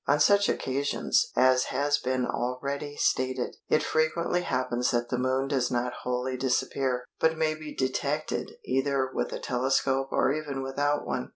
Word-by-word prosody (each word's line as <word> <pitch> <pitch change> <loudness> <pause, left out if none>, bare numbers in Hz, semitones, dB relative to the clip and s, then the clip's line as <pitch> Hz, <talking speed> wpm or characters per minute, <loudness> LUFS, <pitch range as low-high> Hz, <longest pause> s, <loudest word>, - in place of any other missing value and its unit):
On 145 +1 +3
such 200 +5 +5
occasions, 140 +2 0
as 130 0 +4
has 145 +2 +1
been 130 0 0
already 140 +5 -3
stated, 130 -2 0
it - - +3
frequently 170 +3 +1
happens 125 -5 0
that 120 0 0
the 125 - -1
Moon 130 +1 +1
does 135 -3 +1
not 125 0 -1
wholly 125 +1 -2
disappear, 130 0 0 0.2
but 160 0 +2
may 160 -1 +1
be 155 -1 -8
detected 140 +3 -1 0.2
either 135 0 0
with - - -2
a - - -3
telescope 135 +1 0
or - - +2
even 145 -3 -3
without 145 +2 0
one. 125 - -3
135 Hz, 160 wpm, -28 LUFS, 125-145 Hz, 0.2 s, such